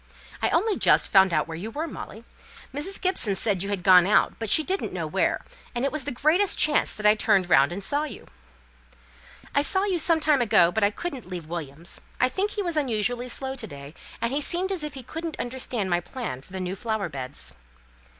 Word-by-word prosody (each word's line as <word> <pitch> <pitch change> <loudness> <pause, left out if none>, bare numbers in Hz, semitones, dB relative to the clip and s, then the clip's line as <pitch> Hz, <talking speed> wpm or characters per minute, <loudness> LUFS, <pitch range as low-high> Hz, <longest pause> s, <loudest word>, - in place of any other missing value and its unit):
"I - - +2
only 405 +5 +1
just - - +4
found 190 -2 +6
out - - +1
where 165 - -6
you 190 +7 -5
were, 300 +8 -4
Molly. 230 -7 -9 0.5
Mrs. 315 +8 -2
Gibson 345 - +1
said 195 -2 +2
you 200 - -2
had 200 -3 -2
gone 180 -1 +7
out, 210 - +3
but 225 -2 -3
she 315 - +5
didn't 380 +4 -2
know - - -3
where; - - 0 0.3
and 240 +3 0
it 275 - 0
was 305 -3 -3
the 290 - -1
greatest 315 +10 +2
chance 300 -1 +4
that 210 - -6
I 210 - +8
turned 200 -4 +1
round 135 +4 +5
and 195 +3 -5
saw 285 +9 0
you." 255 -9 -9 1.3
"I 285 - +3
saw 380 +6 +2
you 380 -4 0
some 330 0 +3
time 300 -4 +3
ago, 175 -7 +4
but 220 +3 0
I 205 - +5
couldn't 265 - -6
leave 175 -3 -6
Williams. 160 0 -6 0.2
I 255 - +3
think 390 +8 -1
he 415 -1 -3
was 345 -3 -2
unusually 245 -2 -1
slow 265 +2 -3
to 245 -4 -4
day; 140 -3 -10 0.3
and 235 +2 -1
he 290 - 0
seemed 365 +5 0
as 365 -5 -1
if 300 -2 -5
he 265 - -8
couldn't 325 +5 -6
understand 245 -5 -3
my 175 - +3
plans 175 - -6
for - - -19
the 190 - -4
new 185 +1 -3
flower 220 -2 -2
beds." 135 - -7
235 Hz, 225 wpm, -25 LUFS, 185-300 Hz, 1.3 s, I